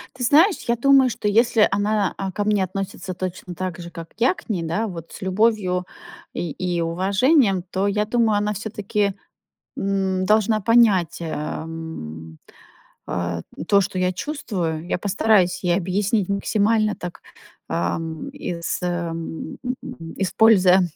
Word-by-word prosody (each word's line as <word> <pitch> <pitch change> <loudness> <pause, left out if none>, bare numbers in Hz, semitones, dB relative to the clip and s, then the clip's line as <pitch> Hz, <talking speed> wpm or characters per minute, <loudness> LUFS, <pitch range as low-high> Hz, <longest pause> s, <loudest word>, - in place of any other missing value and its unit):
Ты 255 - -5
знаешь, 320 - +5
я 235 - +3
думаю, 270 +1 +5
что 215 - -3
если 225 +1 +4
она, 205 0 +1
э, 195 -1 -3
ко 205 - -1
мне 205 -2 +2
относится 185 0 -4
точно 180 0 -5
так 185 0 -4
же, 170 0 -7
как 165 -1 -8
я 240 - +3
к 370 - -16
ней, 185 -6 -1
да, 170 +8 -1
вот 170 -4 -8
с - - -10
любовью 190 -2 +1 0.5
и, 170 - -3
и 175 +1 -2
уважением, 195 - +2
то 190 +2 0
я 210 +1 +1
думаю, 225 -1 +2
она 210 +1 0
все-таки, 210 -1 -2 0.7
м, 190 -1 0
должна 215 +2 +3
понять, 210 -6 +4
эм, 155 - -6 0.7
э, 85 -1 -2 0.3
то, 200 -1 +5
что 185 -1 -2
я 185 0 +1
чувствую. 175 - -3
Я - - 0
постараюсь 200 -1 +2
ей 175 -1 +3
объяснить 195 +2 0
максимально 210 +2 +1
так, 175 -1 -7 0.5
ам, 160 - -2
ис 170 -12 -4
м, 170 -2 -4 0.6
используя 190 -2 +5
195 Hz, 140 wpm, -22 LUFS, 175-215 Hz, 0.7 s, знаешь